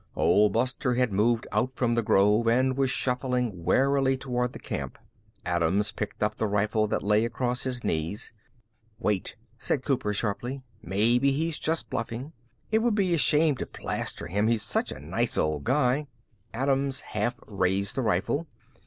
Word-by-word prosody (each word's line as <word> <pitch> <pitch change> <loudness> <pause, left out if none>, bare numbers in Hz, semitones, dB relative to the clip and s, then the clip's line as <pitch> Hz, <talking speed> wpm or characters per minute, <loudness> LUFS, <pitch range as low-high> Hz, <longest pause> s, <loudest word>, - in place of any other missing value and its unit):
Old 100 +4 +4
Buster 125 +1 0
had 125 -4 +1
moved 115 +3 +2
out 120 +6 0
from 120 -2 +1
the 115 - +2
grove 105 +2 +3
and 130 +3 +3
was 135 -1 +1
shuffling 125 -7 -1
warily 135 +4 +2
toward 125 -2 -2
the - - -9
camp. - - -5 0.5
Adams 90 +4 +1
picked 105 0 -4
up 105 0 +1
the 110 - -1
rifle 105 +1 +1
that - - -1
lay 105 +2 +3
across 120 +2 -1
his 125 -2 -2
knees. 80 +8 -2 0.6
"Wait," 105 -5 -1 0.2
said 135 0 -1
Cooper 125 -7 0
sharply. 120 +6 -3 0.2
"Maybe 115 +9 +2
he's 160 +2 -1
just 160 +1 0
bluffing. 115 +6 -4 0.4
It 220 - +4
would 230 -1 +1
be 190 -4 +2
a 165 - +2
shame 150 0 +4
to - - -4
plaster - - -4
him; 100 +6 0
he's 115 -2 +2
such 105 - 0
a - - -7
nice - - -1
old 75 -2 0
guy." 135 +2 +2 0.4
Adams 135 +2 0
half 120 +1 -3
raised 100 0 0
the 135 - -1
rifle. 110 - 0
120 Hz, 165 wpm, -27 LUFS, 105-135 Hz, 0.6 s, Old